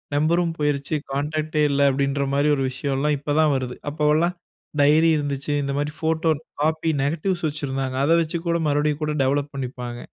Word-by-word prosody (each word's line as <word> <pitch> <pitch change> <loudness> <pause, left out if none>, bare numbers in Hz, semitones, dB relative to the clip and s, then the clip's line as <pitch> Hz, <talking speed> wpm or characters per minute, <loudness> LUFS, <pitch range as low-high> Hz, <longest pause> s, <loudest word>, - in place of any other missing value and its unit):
நம்பரும் 165 +3 +2
போயிருச்சு, 145 0 0 0.2
கான்டாக்டே 150 +2 -1
இல்ல. 140 0 +1
அப்படின்ற 140 +1 0
மாரி 140 +1 +2
ஒரு 135 - -1
விஷயம்லாம் 140 +2 0
இப்போ 145 +1 -2
தான் 155 -2 +4
வருது. 130 -2 -3 0.2
அப்போலாம் 155 +4 +2 0.5
டைரி 155 +3 +5
இருந்துச்சு. 145 0 -2
இந்த 140 - -2
மாரி 145 +1 -2
ஃபோட்டோ 160 0 +1 0.3
காப்பி 160 +1 +1
நெகட்டிவ்ஸ் 170 +4 -1
வச்சிருந்தாங்க. 135 -3 -3
அதை 165 +3 +4
வச்சு 165 +1 -2
கூட 170 0 +2
மறுபடியும் 150 +1 +1
கூட 150 0 -1
டெவலப் 140 +2 0
பண்ணிப்பாங்க. 125 -2 -5
145 Hz, 160 wpm, -23 LUFS, 140-155 Hz, 0.5 s, டைரி